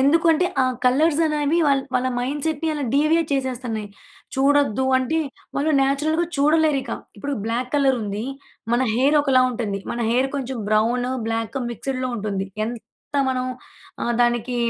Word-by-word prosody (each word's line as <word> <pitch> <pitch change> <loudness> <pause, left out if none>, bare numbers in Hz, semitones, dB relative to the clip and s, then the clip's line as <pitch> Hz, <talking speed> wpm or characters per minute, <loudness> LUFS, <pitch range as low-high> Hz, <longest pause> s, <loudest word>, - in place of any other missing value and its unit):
ఎందుకంటే 325 +4 +4 0.2
ఆ - - +3 0.2
కలర్స్ 295 +5 +3
అనేవి 300 +1 +1
వాళ్ 275 -1 +3
వాళ్ళ 255 0 +2
మైండ్సెట్‌ని 295 +5 -2
అలా 290 -2 -2
డీవియేట్ 310 +2 +3
చేసేస్తన్నాయి. 245 -5 -3 0.5
చూడద్దు 275 -3 +2
అంటే 260 +6 0 0.4
వాళ్ళు 290 +3 +1
నేచురల్‌గా 300 +5 +1
చూడలేరు 300 0 +3
ఇక - - -8 0.3
ఇప్పుడు 280 +8 -4
బ్లాక్ 240 +3 -2
కలరుంది, 235 -7 +1 0.5
మన 240 +2 +3
హెయిర్ 275 +5 +3
ఒకలా 265 -3 +4
ఉంటుంది. 220 -5 -3
మన 240 - -3
హెయిర్ 255 +3 +2
కొంచెం 265 -2 -4
బ్రౌన్, 235 +4 +2 0.2
బ్లాక్ 225 +3 -2
మిక్స్డ్‌లో 255 +2 -3
ఉంటుంది. 200 -2 -3 0.2
ఎంత 230 +4 -10 0.2
మనం 255 -1 -1 0.6
ఆహ్, 240 - 0
దానికి 240 +1 0
265 Hz, 140 wpm, -22 LUFS, 240-290 Hz, 0.6 s, ఎందుకంటే